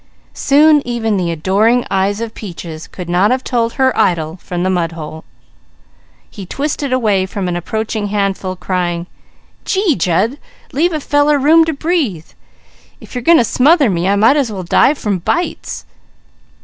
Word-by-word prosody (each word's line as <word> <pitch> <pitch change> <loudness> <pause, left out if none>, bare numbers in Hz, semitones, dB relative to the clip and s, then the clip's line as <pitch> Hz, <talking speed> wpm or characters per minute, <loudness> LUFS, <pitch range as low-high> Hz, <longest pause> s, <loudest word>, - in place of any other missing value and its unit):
Soon 295 +1 +4
even 230 -3 -1
the 180 -3 -1
adoring 200 +9 +1
eyes 195 +2 0
of 230 -1 -5
Peaches 170 -5 -8
could 180 -2 -8
not 180 +4 +2
have 255 +1 0
told 230 -2 -1
her 260 -1 +1
idol 160 -1 0
from 175 0 -4
the 185 - +1
mudhole. 165 -3 -4 1.0
He 200 - -10
twisted 280 +6 -3
away 210 -7 +1
from 195 -1 -4
an 175 - -2
approaching 215 +4 -3
handful 195 -2 -2
crying: 175 -2 -2 0.6
"Gee 380 -5 +1
Jud! 190 - 0 0.3
Leave 330 +6 +1
a 310 - -1
feller 290 +1 +2
room 320 +4 +5
to 320 - -1
breathe! 280 - -1 0.7
If - - -14
you 250 - -2
are - - -8
going 335 +7 +5
to - - +4
smother 275 - +3
me, 175 0 -1
I 200 - +3
might 225 +8 +4
as 265 -6 0
well 190 -3 -5
die 265 - +3
from 205 -8 -2
bites!" 345 - -3
210 Hz, 165 wpm, -16 LUFS, 180-275 Hz, 1.0 s, room